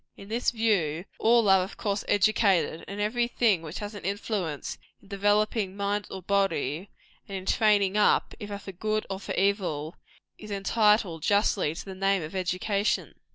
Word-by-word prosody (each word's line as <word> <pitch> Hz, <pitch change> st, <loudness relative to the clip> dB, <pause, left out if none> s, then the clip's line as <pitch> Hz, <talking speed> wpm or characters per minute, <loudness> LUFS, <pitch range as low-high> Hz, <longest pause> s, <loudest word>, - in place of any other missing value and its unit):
In 195 Hz, -, -12 dB
this 235 Hz, +3 st, +1 dB
view, 190 Hz, -8 st, 0 dB
all 230 Hz, -1 st, +4 dB
are 190 Hz, -1 st, +6 dB
of 190 Hz, -, -8 dB
course 200 Hz, -1 st, -2 dB
educated; 200 Hz, -5 st, +2 dB
and 200 Hz, +1 st, -6 dB
every 235 Hz, +3 st, +1 dB
thing 220 Hz, -7 st, +2 dB
which 160 Hz, +1 st, -7 dB
has 205 Hz, 0 st, -5 dB
an 205 Hz, -, -9 dB
influence 195 Hz, -6 st, -3 dB, 0.2 s
in -, -, -21 dB
developing 205 Hz, 0 st, +1 dB
mind 200 Hz, 0 st, -1 dB
or 190 Hz, -, -7 dB
body, 195 Hz, -4 st, 0 dB, 0.4 s
and 195 Hz, -, -4 dB
in 185 Hz, -, -8 dB
training 205 Hz, -2 st, +3 dB
up, 210 Hz, -, +3 dB
either 205 Hz, -1 st, -5 dB
for 200 Hz, -1 st, -9 dB
good 215 Hz, +3 st, -2 dB
or 190 Hz, -, -3 dB
for -, -, -5 dB
evil, 180 Hz, -6 st, 0 dB, 0.4 s
is 210 Hz, -, -10 dB
entitled, 205 Hz, -3 st, +2 dB
justly, 200 Hz, -4 st, +2 dB
to -, -, -7 dB
the 195 Hz, -, -7 dB
name 195 Hz, -1 st, +1 dB
of 155 Hz, -, -7 dB
education. 190 Hz, +3 st, -1 dB
200 Hz, 170 wpm, -27 LUFS, 185-210 Hz, 0.4 s, are